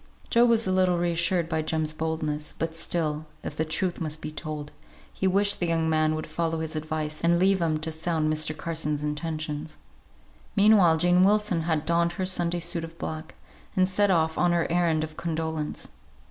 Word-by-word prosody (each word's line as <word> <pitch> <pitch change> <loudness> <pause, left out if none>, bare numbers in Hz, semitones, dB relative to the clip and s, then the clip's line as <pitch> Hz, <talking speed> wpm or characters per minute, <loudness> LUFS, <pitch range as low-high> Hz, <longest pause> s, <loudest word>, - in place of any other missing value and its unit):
Job 235 +1 +5
was 230 -1 +3
a 185 - 0
little 185 -1 +3
reassured 170 0 +1
by 160 -1 -1
Jem's 155 0 0
boldness; 155 -1 -3
but 165 0 -2
still, 155 -2 -1 0.2
if - - -5
the 160 - 0
truth 170 +3 -2
must 155 -1 -2
be 155 - -6
told, 155 -1 -6 0.4
he 190 - 0
wished 200 +2 +2
the 175 - 0
young 165 -1 +1
man 155 -1 +2
would 155 - -4
follow 165 0 -2
his 160 0 -5
advice, 155 0 -3
and 170 +1 +3
leave 190 +1 +3
him 160 -2 +1
to 160 +1 -3
sound 160 -1 0
Mr. 155 0 +1
Carson's 150 -3 -2
intentions. 155 0 -4 0.8
Meanwhile 200 -6 +5
Jane 175 +2 +4
Wilson 205 -2 +3
had 160 -2 -1
donned 170 +1 +2
her 185 +2 -2
Sunday 175 -2 0
suit 170 0 0
of 165 0 -9
black, 155 -1 -6 0.4
and 185 0 +3
set 205 +2 +2
off 160 -3 +2
on 175 -1 +3
her 170 -1 +2
errand 170 -3 +2
of 155 0 -7
condolence. 160 -2 -3
165 Hz, 190 wpm, -26 LUFS, 155-175 Hz, 0.8 s, Job